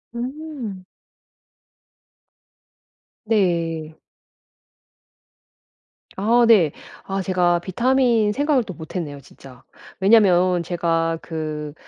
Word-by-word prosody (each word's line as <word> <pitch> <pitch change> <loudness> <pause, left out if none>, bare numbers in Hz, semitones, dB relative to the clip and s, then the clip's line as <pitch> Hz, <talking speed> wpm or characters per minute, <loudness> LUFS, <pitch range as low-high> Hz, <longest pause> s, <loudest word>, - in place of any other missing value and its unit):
음. 255 -6 -6 2.4
네. 170 -7 -1 2.2
아 235 +4 +3
네. 180 -10 +5 0.3
아 195 0 -3
제가 180 -2 +1
비타민 235 +3 +1
생각을 285 -1 +1
또 195 - -8
못했네요 160 -3 -7
진짜. 130 -2 -16 0.4
왜냐면 185 -4 +4
제가 165 -1 -1
그 155 -2 -5
185 Hz, 130 characters per minute, -21 LUFS, 165-230 Hz, 2.4 s, 네